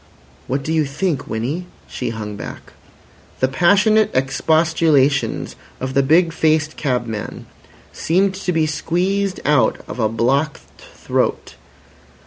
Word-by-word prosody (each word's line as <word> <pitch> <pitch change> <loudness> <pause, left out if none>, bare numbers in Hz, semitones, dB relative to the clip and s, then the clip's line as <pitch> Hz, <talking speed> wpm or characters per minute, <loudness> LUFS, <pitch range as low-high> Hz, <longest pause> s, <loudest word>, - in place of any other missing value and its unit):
"What 135 +1 -2
do 160 - -2
you 155 -2 +2
think, 150 +3 -2
Winnie?" 140 +11 -3 0.2
She - - -4
hung 110 -2 -5
back. - - -9 0.7
The 130 - +3
passionate 200 - +3
expostulations 150 +1 +2 0.2
of 130 0 -4
the 140 - +4
big 165 +4 +3
faced 155 -1 +1
cabman 120 -6 -3 0.5
seemed 190 +4 +1
to 190 -1 -3
be 160 -2 +2
squeezed 185 +6 -1
out 140 -6 +3
of - - -7
a 110 -2 +2
blocked 135 +7 0 0.3
throat. - - -1
155 Hz, 120 wpm, -19 LUFS, 130-170 Hz, 0.7 s, the